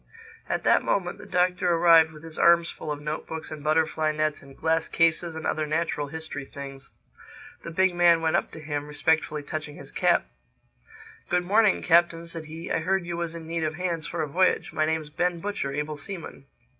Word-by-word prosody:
At - - -1
that - - +4
moment 180 -3 -1
the - - -11
Doctor 180 0 +1
arrived 165 -1 +6
with 155 0 -13
his 165 -1 -9
arms 170 0 +5
full 150 - -6
of 145 - -3
note 150 +1 -4
books 160 0 -6
and 155 -2 -7
butterfly 155 0 +1
nets 155 -1 -1
and 135 -1 -15
glass 160 0 +1
cases 165 0 +1
and 160 - -6
other 155 -1 0
natural 150 -2 -1
history 160 -1 -6
things. 135 0 -8 0.7
The - - -7
big 185 +2 +2
man 175 -1 +5
went 160 -1 +1
up - - +1
to 160 - -8
him, 145 -1 -4
respectfully 150 0 0
touching 150 0 -5
his - - -10
cap. - - +2 1.0
"Good 180 0 +2
morning, 210 +2 +3
Captain," 170 -1 +3
said 165 -1 -7
he. 160 +2 -7
"I - - +1
heard 185 +2 0
you 175 0 -4
was 170 -1 -3
in 165 -1 -8
need 165 0 -2
of 155 0 -1
hands 170 -3 -2
for 165 -2 -2
a - - -3
voyage. 180 +6 +1
My 155 - +1
name's 160 -1 -2
Ben 175 +2 0
Butcher, 200 -7 -3
able 150 +2 -3
seaman." 165 -5 -8
160 Hz, 205 wpm, -26 LUFS, 155-170 Hz, 1.0 s, arrived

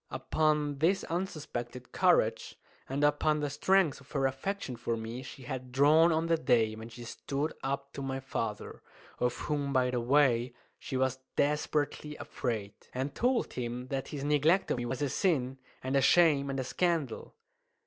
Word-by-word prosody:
Upon 150 +1 0
this 185 +5 +2
unsuspected 140 -9 -4
courage, - - +2 0.3
and 140 +2 -1
upon 150 +1 +3
the 145 -1 -2
strength 185 0 +2
of 135 - -19
her 135 -2 +1
affection 135 +2 -2
for 115 0 -2
me, 115 +3 -5
she 130 0 -10
had 130 0 -6
drawn 150 +5 +5
on 160 +1 +1
the 165 0 +2
day 115 -8 +2
when 110 +1 -8
she 120 +1 -10
stood 140 +5 -3
up 140 +1 -3
to - - -6
my 135 0 -3
father 115 -5 -4 0.4
of 125 -1 +1
whom, 145 -2 -2
by 130 -2 +2
the 125 -1 0
way, 125 -2 +3 0.2
she 130 - -4
was 130 0 0 0.2
desperately 150 0 0
afraid 110 -9 -4 0.2
and 135 +2 -2
told 245 - +1
him 125 +1 -4
that 135 -1 -2
his 140 -2 -5
neglect 150 +6 +3
of - - +1
me 120 0 -3
was 130 +3 -2
a 140 - 0
sin 135 -5 0 0.2
and 130 +1 -1
a 135 - +4
shame 150 -4 +5
and 135 0 -2
a - - 0
scandal. 160 -3 -1
135 Hz, 175 wpm, -31 LUFS, 125-150 Hz, 0.4 s, drawn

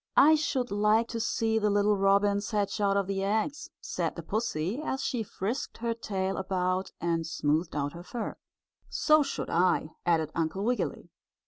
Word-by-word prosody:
"I 300 +3 +8
should 280 -5 0
like 210 +3 +3
to 230 - -3
see 225 -1 +1
the 210 -1 +2
little 205 +1 +3
robins 200 +1 +2
hatch 205 -1 -1
out 200 -1 +3
of 200 - +1
the 195 0 -2
eggs," 220 +9 -1
said - - -3
the - - -6
pussy, 215 - -2
as 270 -3 -2
she 245 - -1
frisked 215 +3 -4
her 235 0 -1
tail 195 -4 -2
about 185 0 -1
and 170 -1 0
smoothed 155 +1 0
out 145 -1 -1
her 170 - -8
fur. 225 +6 -5 0.5
"So 310 -1 +4
should 275 - -3
I," 175 -2 +2
added 165 -3 +1
Uncle 165 +4 -1
Wiggily. 245 +3 -2
200 Hz, 175 wpm, -29 LUFS, 185-230 Hz, 0.5 s, I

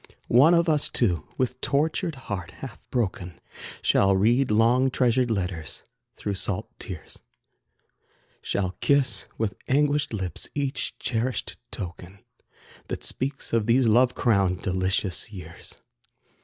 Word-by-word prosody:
One 145 +9 +6
of 170 0 +3
us 150 -2 +2
two, 90 -10 +1
with 130 0 -1
tortured 160 +3 0
heart 100 -9 -5
half 115 +4 -11
broken, 95 -7 -2 0.4
Shall 95 0 +4
read 120 +7 +3
long 115 +5 +4
treasured 125 -1 +2
letters 90 -7 -3 0.3
through 100 - -3
salt 95 0 -2
tears, - - -8 1.2
Shall 95 -2 -1
kiss 130 -8 +2
with 110 -3 -1
anguished 145 +1 +2
lips 95 -5 -3
each 140 -1 -2
cherished 120 +1 -2
token, 90 -1 -7 0.7
That - - -5
speaks 135 -1 -3
of 115 -2 +2
these 120 +1 +4
loved 125 +3 +4
crowned, 95 -6 +2
delicious 95 +2 0
years. 85 -4 -9
115 Hz, 120 wpm, -26 LUFS, 95-130 Hz, 1.2 s, One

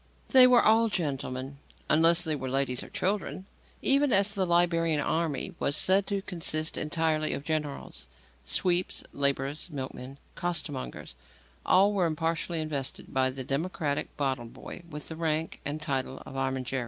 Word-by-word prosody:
They 255 -2 +8
were 250 -1 +6
all 225 +1 +5
gentlemen 135 -6 -3 0.3
unless 165 +2 +6
they 160 -3 +1
were 130 -2 -4
ladies 130 -1 0
or - - -9
children 190 -1 -2 0.4
even 275 0 +4
as 200 0 +3
the 190 -3 0
Liberian 165 -2 +2
army 160 +3 -1
was 145 - +1
said 195 +1 +3
to 200 -1 -1
consist 160 -3 -1
entirely 155 0 0
of - - -5
generals. 150 -2 -4 0.4
Sweeps, 180 - 0
labourers, 140 +3 -1
milkmen, 135 -2 -7 0.2
costermongers 165 - -3 0.5
all 200 +2 +5
were 185 -4 +2
impartially 165 +1 -1
invested 145 -4 -4
by 130 0 +3
the 130 0 -5
democratic 145 +1 -2
bottle 135 -4 -1
boy 115 - -10
with 150 -2 -7
the 160 - -6
rank 160 0 -2
and 145 +2 -3
title 135 -3 -3
of - - -10
armigeri. 130 -1 -2
155 Hz, 150 wpm, -28 LUFS, 140-175 Hz, 0.5 s, They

